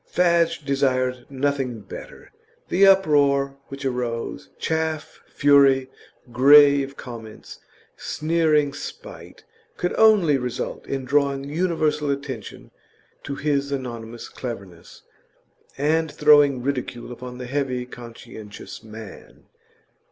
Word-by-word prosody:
Fadge 170 -4 +2
desired 130 -2 0
nothing 135 -4 -2
better; - - -11 0.4
the 195 +2 +5
uproar 140 -7 +3
which 135 0 -8
arose 125 -3 -3
chaff, 160 -1 -3
fury, 135 -2 +4 0.4
grave 140 +1 +6
comments, 115 -4 -10 0.4
sneering 155 -3 +1
spite 145 - -10 0.3
could 180 - -1
only 200 -11 +5
result 125 -1 -5
in 135 -1 -3
drawing 140 0 +1
universal 150 -1 -1
attention 140 -6 -5 0.5
to 140 - -5
his 140 -1 -1
anonymous 120 -4 -6
cleverness, 100 -9 -9 0.7
and 155 +2 +1
throwing 145 -4 +4
ridicule 125 -3 -4
upon 125 0 -8
the 125 - -6
heavy, 130 -2 -2
conscientious 115 -3 -11
man. 110 -1 -12
140 Hz, 100 wpm, -23 LUFS, 125-150 Hz, 0.7 s, grave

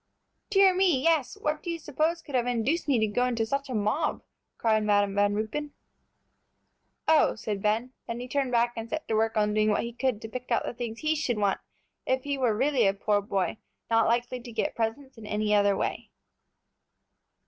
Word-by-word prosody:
"Dear 390 -2 +5
me, 365 -6 +3
yes; 315 -2 +1
what 300 0 -1
do 350 - -6
you 335 - -2
suppose 315 +2 -1
could 285 - -11
have 245 -1 +1
induced 245 +9 0
me 275 -4 +3
to 220 - +3
go 230 +4 0
into 235 -3 0
such 275 +4 -2
a 255 - -3
mob?" 215 +9 0 0.3
cried 220 -2 +2
Madam 205 -1 +2
Van 205 0 +2
Ruypen. 255 +8 -3 1.3
"Oh!" 315 -1 +4
said 210 -2 -4
Ben, 225 +5 0
then 230 +1 -4
he 250 - -6
turned 270 0 -1
back 240 0 +2
and 225 0 -6
set 315 -1 -4
to - - -1
work 220 +1 +1
on 210 0 +2
doing 215 0 +2
what 210 - +1
he 235 0 -5
could 250 -3 -1
to - - -4
pick 250 +2 -7
out 235 - +1
the - - -4
things 235 -2 -6
he 310 0 +1
should 255 -6 -1
want 200 -2 +1 0.5
if 260 0 +1
he 285 -1 -1
were 245 -6 +1
really 260 -3 +3
a 195 - +1
poor 205 0 +1
boy, 195 0 -2 0.3
not 225 0 +4
likely 245 +2 0
to 240 0 -10
get 225 - -1
presents 230 +3 -3
in 215 - -10
any 210 0 0
other 205 -1 +3
way. - - -3
235 Hz, 210 wpm, -27 LUFS, 215-275 Hz, 1.3 s, Dear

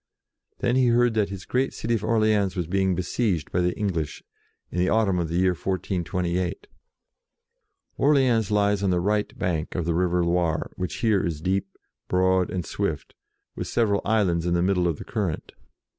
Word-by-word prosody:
Then 125 -1 +2
he 130 -1 +4
heard 120 0 +3
that 105 -3 +1
his 95 -1 -7
great 130 +2 0
city 115 - -2
of 110 -3 -1
Orleans 110 -4 +2
was 90 -2 -1
being 95 +2 +1
besieged 90 -2 -1
by 90 - +1
the 90 0 0
English, 90 -8 -2 0.5
in 90 - -2
the 90 +1 +2
autumn 105 -5 +2
of 85 -2 -2
the 85 - -3
year 95 0 +3
1428. 90 0 -2 1.3
Orleans 130 -7 +3
lies 105 -1 +2
on 100 - +1
the 90 -1 +2
right 105 +3 -1
bank 85 -2 -2
of 90 - -1
the 85 - +1
river 90 0 +1
Loire, 85 -2 0
which 90 - -4
here 105 -4 +3
is 85 -5 -2
deep, 95 +4 0 0.4
broad, 95 0 +2
and 90 -3 -3
swift, - - -3 0.4
with - - -4
several 105 -4 +1
islands 90 -6 +1
in 85 - +1
the 85 - +2
middle 90 -2 +2
of 80 -4 -1
the - - -9
current. 100 -8 -3
95 Hz, 180 wpm, -25 LUFS, 90-105 Hz, 1.3 s, he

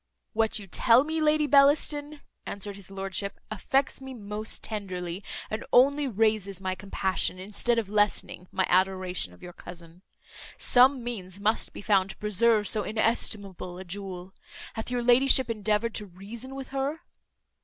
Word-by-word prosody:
"What 220 0 +1
you 205 - -6
tell 230 +6 +4
me, 315 +1 -2
Lady 305 0 +3
Bellaston," 290 +1 +3 0.3
answered 200 0 -5
his 195 -2 -11
lordship, 195 0 -4
"affects 270 +6 0
me 265 -1 -8
most 210 0 -5
tenderly, 185 -3 -4 0.2
and 215 - -4
only 280 +3 +5
raises 215 -4 +1
my 190 -1 -2
compassion, 190 -1 -1
instead 210 +5 -1
of 225 -4 0
lessening 205 -3 0
my 185 -1 +1
adoration 185 - +1
of 90 - -18
your 175 - -9
cousin. 170 0 -11 0.6
Some 255 +1 +5
means 195 -6 -6
must 215 +2 +1
be - - -9
found 195 -3 +3
to - - -8
preserve 210 +1 +2
so 215 - +2
inestimable 205 -5 -1
a 185 - -7
jewel. 190 0 -7 0.4
Hath 220 - -5
your 245 -1 -1
ladyship 255 0 +5
endeavoured 215 +1 0
to 210 - -4
reason 215 +8 -8
with 270 -1 -7
her?" 275 +4 -2
210 Hz, 155 wpm, -27 LUFS, 190-245 Hz, 0.6 s, only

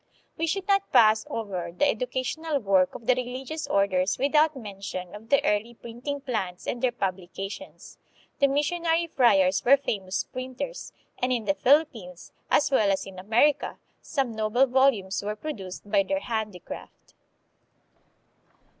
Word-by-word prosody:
We 330 - -1
should 390 +4 -2
not 395 -1 +2
pass 220 -3 +5
over 185 -6 -4
the 235 +12 +2
educational 260 +6 -1
work 195 -6 +2
of 230 - -9
the 255 - +5
religious 255 +5 -4
orders 195 -1 +1
without 300 +3 +3
mention 195 -5 -7
of 215 +2 -11
the 280 +2 +3
early 220 +2 0
printing 245 +6 -6
plants 210 -9 -3
and 240 - -3
their 255 - +2
publications. 195 -2 -6 0.4
The 280 - +5
missionary 330 +4 +1
friars 200 - +3
were 275 +3 +6
famous 195 -8 -2
printers, 260 - -6 0.3
and 250 +1 0
in 235 -3 0
the 195 - +2
Philippines, 230 - +1 0.2
as 290 - +3
well 215 -7 +3
as 195 - 0
in 190 -1 -10
Amer 225 +10 +4
ica, - - -8 0.2
some 270 -6 -2
noble 220 +4 +3
volumes 250 -7 +2
were 210 +1 -3
produced 205 -8 -7
by 200 -1 +3
their 290 +9 -1
handi 220 -7 -3
craft. - - -11
235 Hz, 150 wpm, -26 LUFS, 195-280 Hz, 0.4 s, were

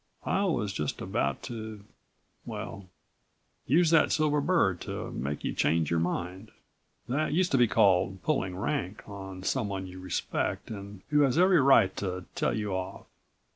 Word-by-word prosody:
I 200 - +1
was 115 - 0
just 75 -6 -3
about 70 0 -1
to 110 -4 -7 0.6
well, 100 -2 -7 0.8
use 165 +5 +4
that 165 - +5
silver 150 -1 +2
bird 140 - +2
to - - -5
make 70 +3 -4
you - - -1
change 80 -1 +1
your 85 - +2
mind. 90 +4 -3 0.6
That 145 +4 0
used 180 +2 +2
to 135 - +4
be 120 - +6
called 95 -2 +3
'pulling 95 -12 0
rank' 105 -2 -3
on 95 -2 -8
someone 100 -5 -1
you 95 0 -9
respect 90 +4 -2
and 100 -2 -8
who 150 -1 +4
has 135 -1 +3
every 180 -2 +5
right 130 -8 +5
to 90 -2 -3
tell - - 0
you 105 -2 -2
off. 95 +1 -4
100 Hz, 160 wpm, -29 LUFS, 95-140 Hz, 0.8 s, be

